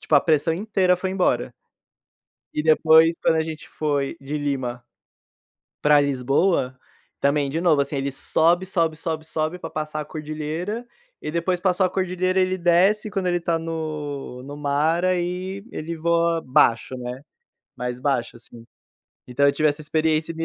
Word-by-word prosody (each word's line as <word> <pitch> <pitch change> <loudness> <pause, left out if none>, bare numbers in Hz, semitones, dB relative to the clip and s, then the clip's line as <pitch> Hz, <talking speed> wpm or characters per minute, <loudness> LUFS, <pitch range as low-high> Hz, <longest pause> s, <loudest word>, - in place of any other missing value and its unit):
tipo, 155 - 0
a 140 - +7
pressão 160 0 +2
inteira 185 -1 +2
foi 185 +1 -3
embora. 130 -10 0 1.0
E, 150 - -1
depois, 160 +1 +5
quando 160 - +3
a 160 - +2
gente 160 -1 -7
foi 145 0 -2
de 140 +2 -4
Lima 130 -4 -3 1.0
para 150 0 +5
Lisboa 135 0 +1 0.4
também, 140 0 +1
de 160 +4 -2
novo, 160 -5 +3
assim. 140 +1 -3
Ele 135 0 -2
sobe, 170 +6 +2
sobe, 165 -4 0
sobe, 160 -1 -4
sobe 160 +2 -2
para - - -6
passar 155 0 -4
a - - -6
Cordilheira, 155 +9 -4 0.4
e 150 - -4
depois 175 +2 0
que - - -30
passou 185 0 +3
a - - 0
Cordilheira, 185 0 0
ele 185 0 +1
desce, 185 +5 +3
quando 195 -3 -2
ele 175 0 +2
está 170 -1 0
no 155 -5 -5
no 145 +1 -8
mar, 150 +4 +1
aí 185 +2 -2
ele 165 +1 -5
voa 170 0 +1
baixo, 130 -2 +3
né, 125 +2 -6 0.5
mais 125 0 -4
baixo, 130 -4 -1
assim, 115 0 -14 0.6
então 135 +3 +2
eu 140 - +4
tive 155 +2 +1
essa 145 +2 -2
experiência 155 +2 0
e - - -13
me 165 0 -3
155 Hz, 170 wpm, -23 LUFS, 140-175 Hz, 1.0 s, a